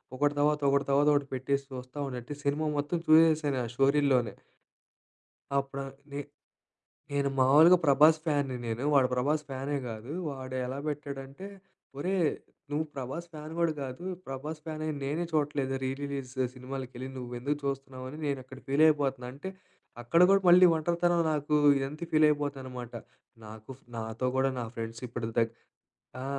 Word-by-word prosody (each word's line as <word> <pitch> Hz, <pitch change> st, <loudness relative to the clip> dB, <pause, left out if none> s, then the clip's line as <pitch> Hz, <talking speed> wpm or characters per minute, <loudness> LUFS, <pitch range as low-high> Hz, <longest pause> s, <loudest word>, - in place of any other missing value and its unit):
ఒకటి 145 Hz, +2 st, +2 dB
తర్వాత 150 Hz, +1 st, +2 dB
ఒకటి 140 Hz, 0 st, +2 dB
తర్వాత 140 Hz, +2 st, +4 dB
ఒకటి 145 Hz, -1 st, +1 dB
పెట్టేసి 140 Hz, +2 st, -1 dB
చూస్తా 130 Hz, +1 st, -8 dB
ఉంటంటే 125 Hz, +1 st, -6 dB
సినిమా 145 Hz, +2 st, 0 dB
మొత్తం 145 Hz, +4 st, 0 dB
చూసేసాను 155 Hz, -3 st, +5 dB
ఆ -, -, -2 dB
స్టోరీల్లోనే. 135 Hz, -4 st, +3 dB, 1.2 s
అప్పుడా 140 Hz, 0 st, -1 dB, 0.3 s
నే 140 Hz, -, -4 dB, 0.9 s
నేను 140 Hz, -1 st, +1 dB
మామూలుగా 150 Hz, +7 st, +7 dB
ప్రభాస్ 150 Hz, +2 st, +6 dB
ఫ్యాన్‌ని 145 Hz, -5 st, 0 dB
నేను, 115 Hz, +1 st, -3 dB
వాడు 135 Hz, -2 st, +5 dB
ప్రభాస్ 145 Hz, +5 st, +1 dB
ఫ్యానే 135 Hz, +2 st, -2 dB
కాదు. 110 Hz, +3 st, -8 dB, 0.2 s
వాడెలా 130 Hz, -1 st, -4 dB
పెట్టాడంటే, 140 Hz, +3 st, -6 dB, 0.5 s
ఒరే 185 Hz, +7 st, 0 dB, 0.5 s
నువ్వు 150 Hz, +2 st, 0 dB
ప్రభాస్ 140 Hz, +6 st, -5 dB
ఫ్యాన్ 155 Hz, +1 st, -8 dB
కూడా 170 Hz, -1 st, +3 dB
కాదు, 130 Hz, +5 st, -6 dB, 0.2 s
ప్రభాస్ 150 Hz, +4 st, -5 dB
ఫ్యానై 155 Hz, -1 st, -4 dB, 0.2 s
నేనే 150 Hz, +5 st, -1 dB
చూడట్లేదు 145 Hz, -3 st, 0 dB
రీ 130 Hz, -, 0 dB
రిలీజ్ 140 Hz, -2 st, -4 dB
స్ 130 Hz, -, -4 dB
సినిమాలకి 130 Hz, 0 st, -6 dB
వెళ్ళి 130 Hz, +2 st, -5 dB
నువ్వు 125 Hz, -1 st, -7 dB
ఎందుకు 145 Hz, +3 st, -1 dB
చూస్తున్నావు 135 Hz, -2 st, -4 dB
అని 150 Hz, +4 st, -8 dB
నేను 140 Hz, -1 st, 0 dB
అక్కడ 130 Hz, +1 st, -11 dB
ఫీల్ 140 Hz, +3 st, +2 dB
అయిపోతున్నా 135 Hz, -4 st, 0 dB
అంటే 170 Hz, +8 st, -6 dB, 0.5 s
అక్కడ 120 Hz, +8 st, +2 dB
గూడా 195 Hz, 0 st, +5 dB
మళ్ళీ 180 Hz, +1 st, +9 dB
ఒంటరితనం 170 Hz, +2 st, +1 dB
నాకు 150 Hz, 0 st, -1 dB, 0.2 s
ఇదంతా 140 Hz, +5 st, -4 dB
ఫీల్ 155 Hz, 0 st, +6 dB
అయిపోతా 145 Hz, -2 st, -1 dB
అనమాట. 125 Hz, -2 st, -7 dB, 0.5 s
నాకు 110 Hz, +2 st, -11 dB, 0.3 s
నాతో 110 Hz, +2 st, -3 dB
కూడా 135 Hz, 0 st, +3 dB
నా -, -, -2 dB
ఫ్రెండ్స్ 115 Hz, +1 st, -5 dB
ఇప్పుడు 120 Hz, -1 st, -4 dB
దా 115 Hz, -, +6 dB, 0.8 s
ఆ! -, -, -4 dB
140 Hz, 150 wpm, -29 LUFS, 130-150 Hz, 1.2 s, మళ్ళీ